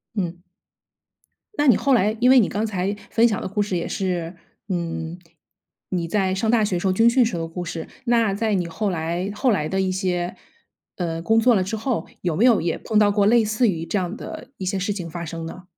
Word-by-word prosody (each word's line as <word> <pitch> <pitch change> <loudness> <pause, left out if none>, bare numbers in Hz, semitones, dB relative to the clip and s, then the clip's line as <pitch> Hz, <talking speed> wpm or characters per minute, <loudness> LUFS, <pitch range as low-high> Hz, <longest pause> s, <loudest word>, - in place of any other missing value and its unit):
嗯。 175 -3 -3 1.2
那 295 - +2
你 245 - +7
后 275 +6 +2
来 215 -2 +3
因 250 +1 +4
为 260 0 +8
你 215 - +3
刚 210 +2 -2
才 200 -1 -2
分 230 +1 +4
享 210 -4 -1
的 - - -3
故 200 +2 -1
事 200 -2 -1
也 170 - -3
是， 180 -3 -2 0.3
嗯， 165 -1 -3 0.7
你 175 -3 -2
在 190 +1 +1
上 220 +4 -1
大 225 -1 +4
学 190 -4 0
时 190 - -1
候、 185 - +2
军 225 +5 +5
训 245 0 +4
时 220 - -2
候 170 - -2
的 - - -4
故 175 +2 -5
事。 165 0 -5 0.2
那 230 -4 +2
在 215 +1 0
你 180 -3 -1
后 170 +6 -2
来 175 +2 -2
后 255 +3 +2
来 155 -8 0
的 190 +3 0
一 190 -1 0
些 180 -2 -2 0.6
呃， 165 -2 -3
工 225 +6 +3
作 240 +2 +5
了 190 - +2
之 195 +4 -3
后， 220 -5 -2
有 175 -4 -1
没 210 +9 +3
有 235 -7 +5
也 165 0 -1
碰 220 - -1
到 210 -1 +5
过 200 0 +2
类 230 +2 +5
似 215 +3 +1
于 165 -5 -1
这 205 - -1
样 180 +2 -3
的 245 - -8
一 190 - -5
些 190 +1 -1
事 200 +2 -1
情 180 -4 -6
发 170 +1 -6
生 165 0 -6
呢？ 175 +3 -8
190 Hz, 260 characters per minute, -23 LUFS, 175-220 Hz, 1.2 s, 为